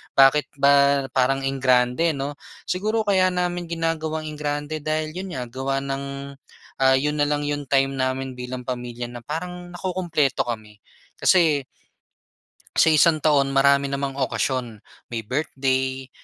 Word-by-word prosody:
Bakit 135 +2 +5
ba 140 0 +4
parang 135 +1 +1
engrande, 130 +3 +2
'no? 140 +1 -5 0.2
Siguro 215 +4 -1
kaya 190 -3 +3
namin 175 -1 -1
ginagawang 160 -1 -2
engrande 150 +1 -3
dahil 155 +1 -2
'yon 185 +3 -6
nga, 125 - -3
gawa 135 +1 -2
ng, 135 0 -3 0.8
ah, 130 0 +5
'yon 150 +2 0
na 145 - +3
lang 145 0 0
'yong 145 -1 -3
time 135 0 +2
namin 130 0 -1
bilang 125 0 -6
pamilya 120 -1 -5
na 120 - -7
parang 175 +6 -6
nakukumpleto 165 -8 0
kami. 105 -3 -6 0.4
Kasi 160 -7 +4 1.1
sa - - +5
isang 155 0 +4
taon 140 -3 +3
marami 140 0 +4
namang 140 0 -3
okasyon. 125 -4 -2 0.3
May 115 - -2
birthday, 130 +1 -1
140 Hz, 135 wpm, -23 LUFS, 130-155 Hz, 1.1 s, Bakit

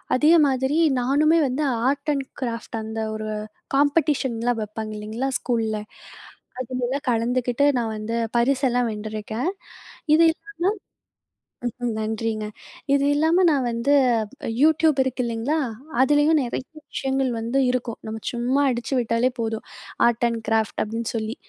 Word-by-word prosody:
அதே 300 +6 +5
மாதிரி 265 +3 0 0.2
நானுமே 300 +6 +3
வந்து 260 +4 -1 0.2
ஆர்ட் 285 +2 0
அண்ட் 270 -1 -3
கிராஃப்ட், 230 -2 -4
அந்த 220 0 -5 0.2
ஒரு 215 0 -4 0.5
காம்படீஷன்லாம் 270 -6 +1
வைப்பாங்க 215 +1 -6
இல்லீங்களா? 220 +6 -3
ஸ்கூல்ல. 225 -3 -1 0.8
அதுலலாம் 255 +3 -3
கலந்துக்கிட்டு, 245 +3 +1
நான் 225 -2 -2
வந்து 225 +2 -3 0.2
பரிசெல்லாம் 245 -1 +2
வென்றிருக்கேன். 215 - -3 0.7
இது 330 - +5
இல்லாம 410 - -35 1.2
ம். 240 - 0
ம். 235 - 0
நன்றிங்க. 220 0 -2 0.5
இது 280 - +3
இல்லாம 320 +5 +3
நான் 275 -4 +1
வந்து 235 +4 0 0.7
யூடியூப் 315 -1 +4
இருக்கு 260 -1 -2
இல்லீங்களா? 235 +7 -1 0.4
அதிலேயும் 295 +3 +4
நிறைய 250 0 -3 0.3
விஷயங்கள் 270 -1 0
வந்து 235 +4 0
இருக்கும். 245 -2 -2
நம்ம 220 0 -5
சும்மா 250 +4 +1
அடிச்சு 240 +2 -2
விட்டாலே 230 +2 +1
போதும். 225 -1 -2 0.4
ஆர்ட் 235 0 +2
அண்ட் 230 -1 -2
கிராஃப்ட் 220 -1 +1
அப்பிடின்னு 225 +2 -3
சொல்லி. 220 +2 -2
245 Hz, 130 wpm, -23 LUFS, 225-275 Hz, 1.2 s, அதே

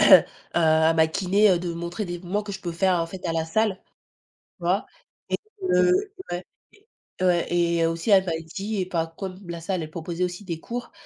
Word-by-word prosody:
heu, - - +9 0.3
à 160 -1 +4
ma 160 -1 +5
kiné, 195 +5 +3
heu, 180 - +4
de 175 0 -4
me 170 - -3
montrer 170 +4 -4
des 175 0 -4
mouvements 190 +4 -2
que 205 -1 -6
je 190 - -6
peux 175 -3 -4
faire 185 +2 +2
en 165 - -1
fait 185 +2 -9
à 165 - 0
la 165 -1 0
salle. 195 +4 +1 0.8
Tu 175 - -10
vois? 185 +4 +1 0.8
Et - - -1
que 180 - +1
ouais. 175 +1 -4 0.8
Ouais 175 -2 +3
et 170 -1 +3
aussi, 165 +5 -1
elle 190 -2 +6
m'a 170 - 0 0.2
dit- 200 -1 -2
bah 165 -1 -1
comme 190 -2 -5
la 170 -1 -5
salle, 180 0 -1
elle 155 - -6
proposait 170 +2 -3
aussi 180 +3 -4
des 170 -4 -4
cours- 240 +4 -6
175 Hz, 210 wpm, -25 LUFS, 165-195 Hz, 0.8 s, heu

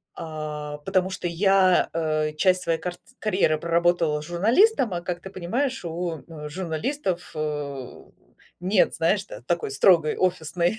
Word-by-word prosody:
А, 150 -2 -5
потому 185 +5 0
что 185 -1 -4
я, 185 +1 +3
а, 155 -2 0
часть 180 +4 +2
своей 165 -2 0
картц 180 -1 -5 0.2
карьеры 190 -7 +2
проработала 170 -2 +1
журналистом, 225 - +3
а 175 - -2
как 175 0 -4
ты 190 - -8
понимаешь, 235 +7 -2
у, 170 -1 -3
э, 150 -3 -8
журналистов, 180 - -3
э, 145 -4 -4 0.6
нет, 185 +2 +2
знаешь, 195 +5 +1
та 195 - -10
такой 170 +3 -2
строгой 155 +2 +4
офисной 175 +2 0
170 Hz, 140 wpm, -25 LUFS, 155-185 Hz, 0.6 s, строгой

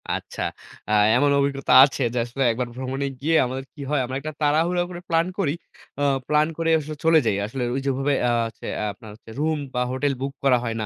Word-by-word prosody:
আচ্ছা। - - -7 0.5
আ - - -1 0.2
এমন 145 +3 +3
অভিজ্ঞতা 140 -2 0
আছে 135 -1 +1
যে, - - -3
আসলে 130 +3 -2
একবার 125 +1 -2
ভ্রমণে 130 +2 -3 0.2
গিয়ে 160 +2 +1
আমাদের 130 +2 -4
কি 145 - -11
হয়? 150 -3 +1
আমরা 130 +2 -5
একটা 155 +2 -5
তাড়াহুড়া 165 +4 +2
করে 175 -1 -7
প্লান 165 +1 +2
করি, 150 -6 +1 0.5
আ - - +2 0.2
প্লান 150 +1 +3
করে 165 0 0
আসলে 155 +1 -6
চলে 165 -1 +6
যাই। 100 - +2
আসলে 125 +3 -4
ঐ - - -2
যে - - +1
ওভাবে 135 +2 0 0.2
আ - - +2 0.2
হচ্ছে, 115 - -12 0.3
আপনার 110 +2 -13
হচ্ছে 115 - -18
রুম 155 0 +1 0.2
বা 125 - 0
হোটেল 140 +2 0
বুক 135 0 -3
করা 130 -3 +5
হয় 115 -1 -3
না, - - -2
140 Hz, 220 wpm, -23 LUFS, 130-155 Hz, 0.5 s, চলে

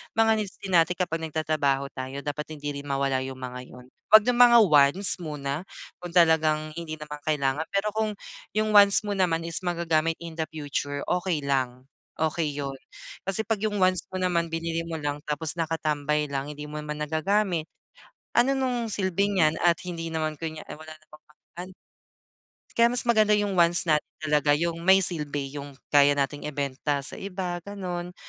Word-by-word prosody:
mga 225 0 +3
needs 200 -3 -5
din 195 - -5
natin 175 0 +3
kapag 175 -3 -2
nagtatrabaho 145 -3 -1
tayo 130 +2 -7
dapat 150 0 -5
hindi 145 -1 -6
rin 145 - -10
mawala 135 -1 -1
yung 130 0 -7
mga 125 0 -6
yun. 125 0 -14 0.3
Huwag 215 +1 +7
ng 245 0 +1
mga 235 -1 +7
wants 150 +6 +7
muna, 145 0 -5 0.4
kung 175 - -7
talagang 155 -3 +2
hindi 155 -2 -6
naman 150 -1 -8
kailangan 145 0 0
pero 200 +2 -1
kung 215 -1 -2 0.4
yung 215 0 0
wants 205 0 +7
mo 205 - -4
naman 175 -4 0
is 165 -1 +4
magagamit 165 -2 0
in 165 -1 -8
the 160 - +1
future, 145 -2 -4
okay 180 -3 -1
lang, 130 -2 -2 0.3
okey 160 -1 -1
yun. 140 -1 -4 0.5
Kasi 195 +3 +1
'pag 220 -2 -2
yung 205 -2 -1
wants 185 -1 +2
mo 185 - -4
naman 170 -2 -1
binili 165 0 -3
mo 165 -1 -6
lang 145 0 -4
tapos 150 +1 0
nakatambay 150 -2 -1
lang, 140 +1 -4
hindi 150 0 -9
mo 150 - -10
naman 150 0 -6
nagagamit, 160 +2 -1 0.6
ano 270 +2 +2
nung 250 -3 -2
silbi 200 -1 0
niyan 160 -5 +1
at 170 -1 +3
hindi 165 -2 -5
naman 155 -1 -2
kunya 160 -1 -6
ay - - -9
wala 155 +1 -12
namang 155 -1 -15
pag 150 - -26 0.2
an 185 - -9 1.0
Kaya 235 0 +4
mas 245 0 +5
maganda 215 -3 +3
yung 205 -1 -1
wants 170 0 +5
natin 155 -2 0
talaga, 150 -1 +2
yung 165 +1 -3
may 190 0 +6
silbi 145 -5 0
yung 140 0 -11 0.2
kaya 145 0 +5
nating 145 +1 -2
ibenta 140 0 -3
sa - - -1
iba, 185 -2 -5
ganon 180 -3 -6
160 Hz, 180 wpm, -25 LUFS, 145-185 Hz, 1.0 s, Huwag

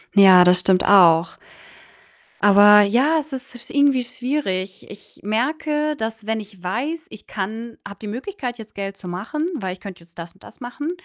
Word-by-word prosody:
Ja, 190 -3 +8
das 180 0 +4
stimmt 185 0 +1
auch. 175 -4 +5 1.0
Aber 205 +1 +7
ja, 250 +10 +2
es 305 0 -9
ist 260 -2 -8
sch - - -20
irgendwie 285 -3 +2
schwierig. 245 -7 -4
Ich 205 - -15
merke, 300 +7 -1
dass 220 -2 -6
wenn 225 0 -1
ich 200 -3 -13
weiß, 280 - -4
ich 215 - -14
kann 220 +4 -6
habe 200 - -12
die 215 - -7
Möglichkeit, 250 - -6
jetzt 220 -2 -13
Geld 195 0 -6
zu 185 - -11
machen, 220 - -4
weil 190 -9 -4
ich 185 - -14
könnte 190 -3 -10
jetzt 170 0 -18
das 170 0 -9
und 190 - -25
das - - -15
machen, 250 +5 -6
215 Hz, 185 wpm, -21 LUFS, 190-260 Hz, 1.0 s, Ja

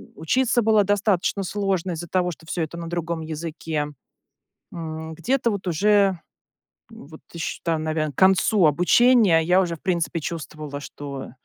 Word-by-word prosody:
учиться 240 +8 +1
было 215 -1 +4
достаточно 200 -1 +1
сложно 190 -2 -1
из-за 170 +1 -5
того, 180 +1 0
что 160 - -13
всё 170 +1 -3
это 160 +2 -6
на 170 -1 -6
другом 170 -1 -3
языке. 155 -1 -4 0.9
М, 160 -1 -6
где-то 240 +8 0
вот 200 -3 -4
уже, 195 +1 +3 0.7
вот 160 -9 -13
ищ 165 - -4
там 160 -2 -1
наверно, 155 -1 -1
к - - -34
концу 190 0 +4
обучения 180 - +5
я 180 +3 +3
уже, 170 -3 -1
в - - -25
принципе, 170 -3 -1
чувствовала, 150 -2 -6
что, 140 -2 -8
170 Hz, 150 wpm, -23 LUFS, 160-195 Hz, 0.9 s, обучения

